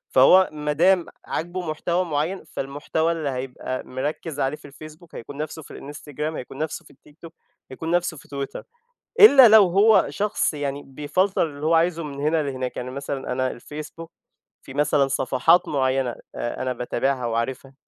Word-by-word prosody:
فهو 185 Hz, +9 st, +7 dB
ما 150 Hz, -1 st, -3 dB
دام 180 Hz, +2 st, +3 dB, 0.2 s
عاجبه 175 Hz, 0 st, -4 dB
محتوى 170 Hz, +4 st, -1 dB
معيَّن، 160 Hz, +4 st, -2 dB
فالمحتوى 145 Hz, +4 st, -2 dB
اللي 160 Hz, -4 st, -2 dB
هيبقى 130 Hz, 0 st, -5 dB
مركِّز 145 Hz, +4 st, -4 dB
عليه 135 Hz, +3 st, 0 dB
في 145 Hz, -, -14 dB
الFacebook، 155 Hz, +4 st, -13 dB
هيكون 140 Hz, +4 st, -9 dB
نفسه 155 Hz, +1 st, -5 dB
في -, -, -11 dB
الInstagram، 150 Hz, +2 st, -6 dB
هيكون 130 Hz, +2 st, -8 dB
نفسه 155 Hz, +1 st, -4 dB
في -, -, -18 dB
الTikTok، 150 Hz, +4 st, -15 dB, 0.4 s
هيكون 160 Hz, +5 st, -5 dB
نفسه 175 Hz, -2 st, 0 dB
في -, -, -15 dB
Twitter. 140 Hz, -1 st, -5 dB, 0.6 s
إلا 275 Hz, -, +10 dB
لو 215 Hz, -3 st, +7 dB
هو 200 Hz, +3 st, +5 dB
شخص 205 Hz, -4 st, -1 dB
يعني، 145 Hz, -1 st, -4 dB
بيفلتر 150 Hz, +8 st, 0 dB
اللي 145 Hz, 0 st, -7 dB
هو 165 Hz, -, +3 dB
عايزه 165 Hz, 0 st, +2 dB
من 140 Hz, -2 st, -7 dB
هنا 155 Hz, +2 st, +1 dB
لهناك. 130 Hz, -3 st, -4 dB
يعني 125 Hz, +1 st, -5 dB
مثلًا 140 Hz, -1 st, -5 dB
أنا 130 Hz, -2 st, -2 dB
الFacebook، 155 Hz, +4 st, -9 dB, 0.6 s
في 135 Hz, -, -11 dB
مثلًا 145 Hz, -1 st, +2 dB
صفحات 135 Hz, +6 st, +2 dB
معيَّنة 130 Hz, -3 st, 0 dB, 0.2 s
آآ، 120 Hz, +2 st, -4 dB
أنا 130 Hz, 0 st, -1 dB
باتابعها 125 Hz, +1 st, -1 dB
وعارفها، 125 Hz, +4 st, -3 dB
150 Hz, 165 wpm, -23 LUFS, 135-165 Hz, 0.6 s, إلا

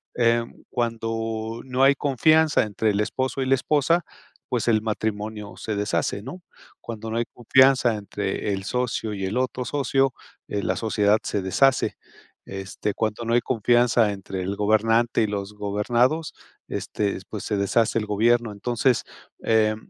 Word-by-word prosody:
em, 115 Hz, -1 st, +1 dB
cuando 115 Hz, -1 st, -3 dB
no 130 Hz, 0 st, 0 dB
hay 135 Hz, +1 st, +7 dB
confianza 155 Hz, +4 st, +3 dB
entre 105 Hz, +1 st, -1 dB
el 100 Hz, 0 st, 0 dB
esposo 130 Hz, +5 st, -2 dB
y -, -, 0 dB
la 135 Hz, -, +3 dB
esposa, 150 Hz, +5 st, +2 dB, 0.5 s
pues 120 Hz, -2 st, -1 dB
el 110 Hz, -2 st, +3 dB
matrimonio 105 Hz, -1 st, -3 dB
se 110 Hz, -, -4 dB
deshace, 100 Hz, 0 st, -1 dB
¿no? 175 Hz, +8 st, -8 dB, 0.4 s
Cuando 110 Hz, -1 st, -6 dB
no 115 Hz, -, -1 dB
hay 120 Hz, -, 0 dB
confianza 130 Hz, 0 st, +4 dB
entre 100 Hz, 0 st, -3 dB
el 95 Hz, 0 st, -4 dB
socio 115 Hz, -2 st, -2 dB
y 95 Hz, -1 st, -3 dB
el 105 Hz, +6 st, -2 dB
otro 130 Hz, 0 st, -1 dB
socio, 135 Hz, -1 st, +1 dB, 0.4 s
eh, 100 Hz, -1 st, -3 dB
la -, -, 0 dB
sociedad 105 Hz, -1 st, +2 dB
se 100 Hz, -, -2 dB
deshace. 130 Hz, +9 st, +2 dB, 0.5 s
Este, 95 Hz, +1 st, -4 dB
cuando 110 Hz, +1 st, -2 dB
no 115 Hz, -, -1 dB
hay 120 Hz, -, +4 dB
confianza 120 Hz, -2 st, +3 dB
entre 95 Hz, -1 st, -6 dB
el 95 Hz, +2 st, -3 dB
gobernante 115 Hz, +3 st, +2 dB
y 110 Hz, -, +2 dB
los 100 Hz, 0 st, -4 dB
gobernados, 120 Hz, +9 st, 0 dB, 0.3 s
este, 100 Hz, -2 st, -2 dB
pues 105 Hz, -, -6 dB
se 105 Hz, -, -1 dB
deshace 110 Hz, +3 st, +2 dB
el 105 Hz, -, -4 dB
gobierno. 115 Hz, +2 st, +2 dB
Entonces, 120 Hz, +4 st, 0 dB, 0.4 s
eh, 110 Hz, -1 st, +3 dB
115 Hz, 155 wpm, -24 LUFS, 105-125 Hz, 0.5 s, hay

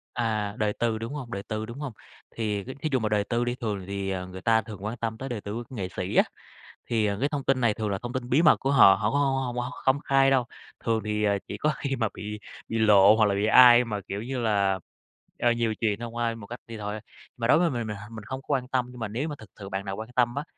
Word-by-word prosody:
À, 110 Hz, -3 st, -1 dB
đời 105 Hz, -1 st, 0 dB
tư, 115 Hz, -2 st, 0 dB
đúng 115 Hz, +5 st, -5 dB
hông? 130 Hz, -6 st, -6 dB
Đời 100 Hz, -1 st, -4 dB
tư, 110 Hz, 0 st, -4 dB
đúng 120 Hz, +5 st, -9 dB
hông? 140 Hz, -6 st, -5 dB, 0.4 s
Thì 105 Hz, -3 st, -2 dB
cái 130 Hz, +2 st, -8 dB
thí 155 Hz, -, -1 dB
dụ 130 Hz, -, +2 dB
mà 110 Hz, -1 st, -1 dB
đời 105 Hz, -1 st, +2 dB
tư 120 Hz, +2 st, -1 dB
đi 120 Hz, 0 st, -1 dB
thường 105 Hz, -7 st, -4 dB
thì 100 Hz, -1 st, -2 dB, 0.2 s
người 95 Hz, 0 st, -9 dB
ta 110 Hz, +2 st, +3 dB
thường 105 Hz, -2 st, -10 dB
quan 115 Hz, +3 st, -3 dB
tâm 110 Hz, -1 st, -3 dB
tới 135 Hz, 0 st, -6 dB
đời 115 Hz, -4 st, -4 dB
tư 100 Hz, +1 st, -6 dB
của 120 Hz, +2 st, -7 dB
nghệ 95 Hz, -5 st, -3 dB
sĩ 90 Hz, +1 st, -3 dB
á, -, -, +7 dB, 0.7 s
thì, 110 Hz, -3 st, +2 dB
ờ, 100 Hz, -1 st, 0 dB
cái 140 Hz, +4 st, +1 dB
thông 145 Hz, -3 st, -3 dB
tin 130 Hz, -2 st, +1 dB
này 115 Hz, -3 st, +3 dB
thường 105 Hz, -1 st, -3 dB
là 100 Hz, -, -1 dB
thông 120 Hz, +1 st, -5 dB
tin 125 Hz, -1 st, -4 dB
bí 140 Hz, +6 st, +4 dB
mật 160 Hz, -, +6 dB
của 135 Hz, -, 0 dB
họ, 100 Hz, -8 st, +8 dB
họ 105 Hz, -, 0 dB
cũng 140 Hz, -, +1 dB
hông 135 Hz, -2 st, +2 dB
hông 125 Hz, -2 st, -2 dB
hông -, -, -6 dB
hông -, -, -5 dB
công 135 Hz, +2 st, +4 dB
khai 135 Hz, 0 st, +4 dB
đâu. 130 Hz, -3 st, +3 dB, 0.4 s
Thường 115 Hz, -1 st, +1 dB
thì 105 Hz, 0 st, 0 dB, 0.2 s
chỉ -, -, -5 dB
có 150 Hz, 0 st, +1 dB
khi 135 Hz, -1 st, -2 dB
mà 115 Hz, -3 st, 0 dB
bị 105 Hz, 0 st, -6 dB, 0.3 s
bị 115 Hz, -, -1 dB
lộ 105 Hz, -1 st, +7 dB
hoặc 110 Hz, -, +4 dB
là 100 Hz, -1 st, +1 dB
bị 100 Hz, +2 st, +1 dB
ai 120 Hz, +1 st, +8 dB
mà, 105 Hz, -3 st, -3 dB
kiểu 100 Hz, +2 st, -4 dB
như 130 Hz, 0 st, -3 dB
là, 100 Hz, -4 st, +1 dB, 0.6 s
à, 120 Hz, -, +3 dB
nhiều 115 Hz, -2 st, 0 dB
chuyện 110 Hz, -2 st, 0 dB
thông 120 Hz, 0 st, -6 dB
qua 120 Hz, -, 0 dB
ai 115 Hz, 0 st, -1 dB
một 105 Hz, -3 st, -10 dB
cách 120 Hz, +3 st, -7 dB
đi 115 Hz, -1 st, -7 dB
thôi, 105 Hz, 0 st, -4 dB
ơ. -, -, -5 dB, 0.4 s
Mà 115 Hz, -, -1 dB
đối 155 Hz, -, +6 dB
với 175 Hz, -, +3 dB
mình 120 Hz, -5 st, -3 dB
mình 105 Hz, -, -4 dB
h 105 Hz, +2 st, -11 dB
mình 110 Hz, -2 st, -8 dB
không 130 Hz, +4 st, -5 dB
quan 130 Hz, -3 st, 0 dB
tâm 130 Hz, -1 st, 0 dB
nhưng 125 Hz, -, -11 dB
mà 110 Hz, -, -2 dB
nếu 125 Hz, +9 st, -3 dB
mà 145 Hz, -, -5 dB
thực 110 Hz, -, -13 dB
sự 100 Hz, -, -7 dB
bạn 95 Hz, 0 st, -4 dB
nào 95 Hz, 0 st, -3 dB
quan 110 Hz, +3 st, -7 dB
tâm 120 Hz, 0 st, +2 dB
á, 145 Hz, -, -2 dB
115 Hz, 300 wpm, -27 LUFS, 105-125 Hz, 0.7 s, họ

